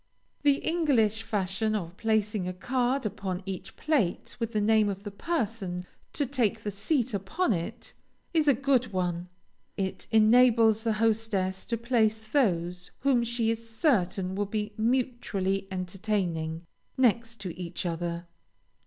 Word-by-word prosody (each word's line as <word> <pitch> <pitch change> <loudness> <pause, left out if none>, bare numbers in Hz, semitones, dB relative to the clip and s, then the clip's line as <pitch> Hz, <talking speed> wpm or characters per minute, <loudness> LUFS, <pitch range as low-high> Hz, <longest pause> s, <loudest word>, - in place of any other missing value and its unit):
The 285 -1 +5
English 255 -11 +2
fashion 215 0 -1
of 175 -4 -4
placing 215 -3 0
a 185 - -3
card 250 +6 0
upon 190 -2 -3
each 190 -2 -6
plate 280 - 0
with 230 -1 -2
the 215 - 0
name 215 0 +4
of 200 0 -5
the 205 - -5
person 205 - -2 0.3
to 290 - 0
take 245 -6 0
that 205 - -2
seat 245 - 0
upon 230 - 0
it, 185 +7 -5 0.4
is 315 -3 +3
a 280 - +6
good 255 -3 +1
one. 175 -1 -1 0.5
It 190 -1 -3
enables 225 0 +5
the 225 -1 +1
hostess 215 -4 0
to 230 - -1
place 225 -2 +2
those 180 - 0
whom 260 -3 +3
she 235 -1 0
is 230 0 -5
certain 195 - +1
will 205 +1 -1
be 210 0 -3
mutually 220 -5 0
entertaining, 180 -4 -2 0.3
next 230 -3 +1
each 180 0 -5
other. 170 0 -3
215 Hz, 140 wpm, -28 LUFS, 190-235 Hz, 0.5 s, a